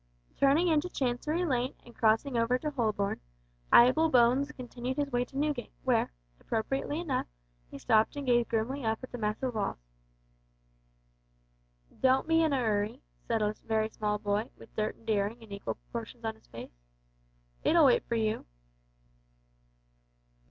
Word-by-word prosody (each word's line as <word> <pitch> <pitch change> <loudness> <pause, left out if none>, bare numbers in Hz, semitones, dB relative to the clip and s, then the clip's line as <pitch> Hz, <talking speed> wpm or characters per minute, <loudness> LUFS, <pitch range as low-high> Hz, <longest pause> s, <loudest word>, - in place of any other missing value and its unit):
Turning 285 +6 +4
into 315 +1 +2
Chancery 300 +6 -1
Lane, 255 -3 0
and 240 - -15
crossing 225 +4 +2
over 235 +2 +2
to 300 +3 -3
Holborn, 215 -7 -1 0.5
Abel 260 +7 +6
Bones 255 +2 +4
continued 250 0 -5
his 285 -1 -1
way 245 0 +1
to 270 - -10
Newgate, 295 -1 -1
where, - - +2 0.3
appropriately 270 +6 -2
enough, 340 -5 -1 0.4
he - - -8
stopped 215 - +2
and 285 -1 -4
gazed 240 -2 +3
grimly 240 +5 -1
up 220 0 0
at 255 - -8
the 245 - -6
massive 220 +4 -1
walls. 210 -3 -2 2.2
"Don't 260 +2 +3
be 325 0 +4
in 320 -2 +2
a 275 - +2
'urry," 215 +3 -1 0.2
said 225 -2 +1
a 210 0 +1
very 220 0 -1
small 210 -1 -1
boy, 205 +2 -1
with - - -16
dirt 215 0 -1
and 225 - -23
daring 210 +1 0
in 220 - -15
equal 200 0 -4
proportions 230 0 -8
on 220 - -1
his 220 - -25
face, 115 - -9 0.9
"it'll 325 -1 +5
wait 255 - +4
for 235 - -1
you." 220 - -1
240 Hz, 155 wpm, -30 LUFS, 220-275 Hz, 2.2 s, Abel